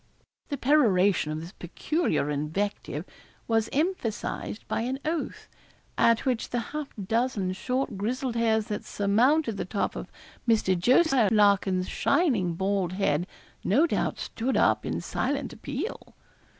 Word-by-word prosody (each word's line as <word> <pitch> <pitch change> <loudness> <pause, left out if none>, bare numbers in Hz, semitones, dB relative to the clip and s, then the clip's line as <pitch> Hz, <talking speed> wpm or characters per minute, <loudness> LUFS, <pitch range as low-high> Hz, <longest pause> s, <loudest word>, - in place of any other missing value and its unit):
The 285 - -2
peroration 205 - +3
of 155 +1 -3
this 165 +2 -8
peculiar 200 - -1
invective 160 +8 -3 0.4
was 225 -1 +1
emphasised 275 - -2
by - - -1
an 255 +3 -2
oath, 320 +1 -3 0.5
at 230 +2 +3
which 250 -4 0
the 245 - -1
half 300 -2 -3 0.2
dozen 220 -4 0
short 250 +2 -2
grizzled 245 +4 -2
hairs 220 -2 +2
that 210 - -4
surmounted 225 +5 +2
the - - -3
top 200 +2 -2
of - - -7 0.4
Mr. 215 -5 +3
Jos. 260 - +4 0.2
Larkin's 200 -3 +3
shining 245 - +1
bald 190 -1 0
head 175 -3 0 0.4
no 270 - +4
doubt - - -1
stood 245 +4 -2
up - - +2
in - - -2
silent 275 -1 -2
appeal. 285 - -6
225 Hz, 135 wpm, -27 LUFS, 190-265 Hz, 0.5 s, Jos